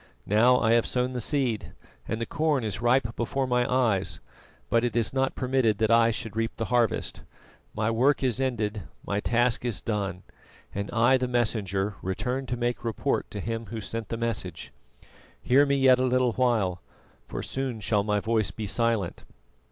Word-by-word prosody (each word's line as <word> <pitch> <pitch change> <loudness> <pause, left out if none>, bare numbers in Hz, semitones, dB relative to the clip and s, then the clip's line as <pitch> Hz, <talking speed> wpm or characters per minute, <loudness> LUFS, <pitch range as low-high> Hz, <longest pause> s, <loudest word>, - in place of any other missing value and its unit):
Now 120 +5 +4
I 115 - +2
have 115 0 +3
sown 125 0 -1
the 125 - -3
seed, 125 -4 -1 0.3
and 110 - -2
the 115 - -2
corn 150 -3 0
is 110 0 -3
ripe 120 -1 +2
before 130 +3 -1
my 125 -1 +1
eyes, 110 -8 +1 0.5
but 115 0 +2
it 120 -3 -1
is 115 -1 +1
not 135 0 0
permitted 125 -5 +1
that 110 +1 +1
I 115 0 +5
should 115 -2 -5
reap 115 0 -1
the 115 - -2
harvest. 120 -3 +1 0.5
My 110 +1 0
work 135 +5 +2
is 130 0 0
ended, 110 -5 -1 0.2
my 100 - -1
task 120 +2 +1
is 115 -7 -1
done, 100 -3 -3 0.5
and 100 +1 -3
I, 120 +3 +4
the 125 0 -1
Messenger, 105 -5 -1
return 125 +8 -2
to 120 - -2
make 120 0 -2
report 115 -3 -1
to - - -6
Him 115 0 -4
Who 115 +3 -5
sent 110 0 -5
the 115 - -3
message. 115 -7 -4 0.7
"Hear 140 +3 +4
me 140 - +2
yet 130 -2 +5
a - - +2
little 130 -1 +2
while, 110 -8 +1 0.5
for - - -5
soon 130 -4 -3
shall 105 -1 +1
my 105 0 +1
voice 110 -2 +1
be 110 +2 -6
silent. 115 -3 0
115 Hz, 185 wpm, -27 LUFS, 110-125 Hz, 0.7 s, I